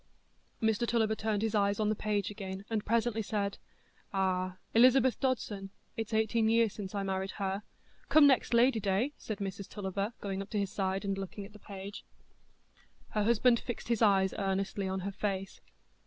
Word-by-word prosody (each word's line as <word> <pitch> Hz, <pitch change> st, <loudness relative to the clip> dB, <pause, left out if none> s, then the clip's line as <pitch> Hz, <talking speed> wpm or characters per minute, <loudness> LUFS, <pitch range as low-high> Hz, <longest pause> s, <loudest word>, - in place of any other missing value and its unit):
Mr 220 Hz, +1 st, +2 dB
Tulliver 220 Hz, -2 st, +2 dB
turned 215 Hz, -1 st, -1 dB
his 225 Hz, -1 st, 0 dB
eyes 200 Hz, -1 st, +2 dB
on 210 Hz, -1 st, +2 dB
the 215 Hz, -, +1 dB
page 205 Hz, -2 st, -1 dB
again, 195 Hz, -1 st, -6 dB
and 215 Hz, -2 st, 0 dB
presently 230 Hz, 0 st, +1 dB
said: 200 Hz, -1 st, -2 dB, 0.5 s
"Ah—Elizabeth 195 Hz, +7 st, +3 dB
Dodson—it's 220 Hz, -4 st, -3 dB
eighteen 220 Hz, 0 st, +2 dB
year 230 Hz, 0 st, +4 dB
since 200 Hz, -1 st, -7 dB
I 200 Hz, -, -1 dB
married 190 Hz, 0 st, -2 dB
her——" 195 Hz, 0 st, -1 dB, 0.5 s
"Come 310 Hz, -1 st, +7 dB
next 270 Hz, -3 st, +4 dB
Ladyday," 235 Hz, 0 st, +3 dB
said 215 Hz, -, -4 dB
Mrs 195 Hz, 0 st, -5 dB
Tulliver, 200 Hz, +2 st, -3 dB
going 195 Hz, -1 st, -3 dB
up 195 Hz, -, -8 dB
to 215 Hz, -, -2 dB
his 200 Hz, -2 st, -1 dB
side 195 Hz, 0 st, -1 dB
and 195 Hz, 0 st, -1 dB
looking 195 Hz, +1 st, -6 dB
at 205 Hz, -, -14 dB
the 210 Hz, -, -13 dB
page. 200 Hz, 0 st, -8 dB, 1.1 s
Her 210 Hz, -1 st, 0 dB
husband 235 Hz, +1 st, +4 dB
fixed 240 Hz, -1 st, -6 dB
his 235 Hz, -2 st, +1 dB
eyes 195 Hz, -3 st, +4 dB
earnestly 195 Hz, 0 st, -1 dB
on 190 Hz, 0 st, -2 dB
her 200 Hz, +2 st, -3 dB
face. 195 Hz, -1 st, -3 dB
205 Hz, 170 wpm, -32 LUFS, 195-225 Hz, 1.1 s, Come